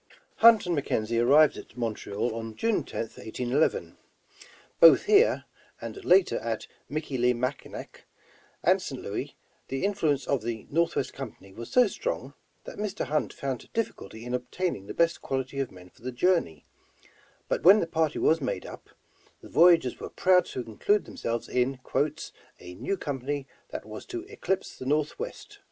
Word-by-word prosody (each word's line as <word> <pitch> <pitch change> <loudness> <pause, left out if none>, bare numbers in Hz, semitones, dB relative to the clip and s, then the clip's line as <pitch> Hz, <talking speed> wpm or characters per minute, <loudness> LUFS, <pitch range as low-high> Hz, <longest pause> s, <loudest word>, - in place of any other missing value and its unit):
Hunt 225 -2 +7
and 175 -1 0
McKenzie 115 -5 0
arrived 145 +4 +5
at 115 - -12
Montreal 115 -1 -2
on 115 -1 -6
June 225 - +1
10th, 115 - -6
1811. 120 - -1 0.8
Both 165 - +8
here, 425 +3 +4 0.3
and 400 - -7
later 185 - +4
at 115 -1 -3 0.2
Michilimackinac 125 -3 -2 0.6
and - - +4
St. - - -5
Louis, - - -5 0.3
the 135 +7 -2
influence 160 -9 +1
of 140 -4 0
the 115 -1 -4
Northwest 160 -4 0
Company 110 -7 -9
was 115 +3 -8
so 250 -1 +5
strong, 475 - -4 0.3
that - - -9
Mr. 210 -1 -2
Hunt 150 0 -1
found 135 -3 -5
difficulty 115 - -4
in 125 - -4
obtain 170 +9 -2
ing 95 0 -12
the - - -7
best 170 0 +2
quality 135 +1 -3
of 135 - -1
men 90 -1 -15
for - - -25
the 130 +2 -4
journey, 120 - +1 0.8
but - - -1
when 195 +5 +8
the - - 0
party 160 -2 0
was 160 0 +3
made 130 - -3
up, - - -10 0.5
the - - -12
voyageurs 165 -7 +5
were - - -6
proud 185 -1 +4
t6 125 - -5
include 200 - +1
themselves 115 0 -4
in 125 +1 0 0.8
*'a 90 - -10
new 195 - -3
company 140 -2 -3 0.2
that - - -6
was - - -9
to 355 -2 -5
eclipse 360 - -3
the 130 - -6
Northwest.'' 410 - -2
140 Hz, 160 wpm, -28 LUFS, 120-180 Hz, 0.8 s, Both